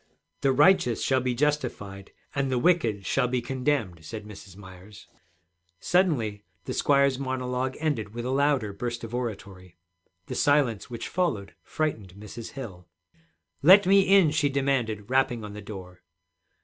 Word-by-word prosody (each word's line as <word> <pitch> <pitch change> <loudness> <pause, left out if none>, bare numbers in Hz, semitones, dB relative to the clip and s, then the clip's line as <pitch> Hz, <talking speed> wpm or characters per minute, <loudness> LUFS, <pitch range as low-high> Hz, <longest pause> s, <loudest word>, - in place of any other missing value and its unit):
'The 135 - +3
righteous 130 - +4
shall 130 -1 +2
be 125 -1 -1
justified, 120 -9 -2 0.2
and 140 -1 -1
the 130 - +1
wicked 120 - +1
shall 135 -2 +1
be 125 +1 0
condemned,' 125 - -2
said 105 +7 -8
Mrs. 100 -3 -12
Myers. 95 +1 -13 0.7
Suddenly 130 - +1 0.2
the - - -4
squire's 140 -2 +2
monologue 130 -1 -2
ended 140 -10 -2
with 120 0 -4
a 130 - -2
louder 135 -6 +1
burst 120 +3 -5
of 115 0 -7
oratory. 95 -7 -6 0.5
The - - -6
silence 140 -8 +1
which 120 -1 -6
followed 110 - -2
frightened 110 -12 -3
Mrs. 105 +3 -9
Hill. 95 -10 -9 0.7
'Let 190 +7 +7
me 195 +1 +6
in!' 195 -5 +5
she 150 -2 +1
demanded, 130 -7 -1
rapping 130 -3 +1
on 105 -1 -7
the 105 - -8
door. 95 -3 -10
125 Hz, 150 wpm, -26 LUFS, 105-140 Hz, 0.7 s, Let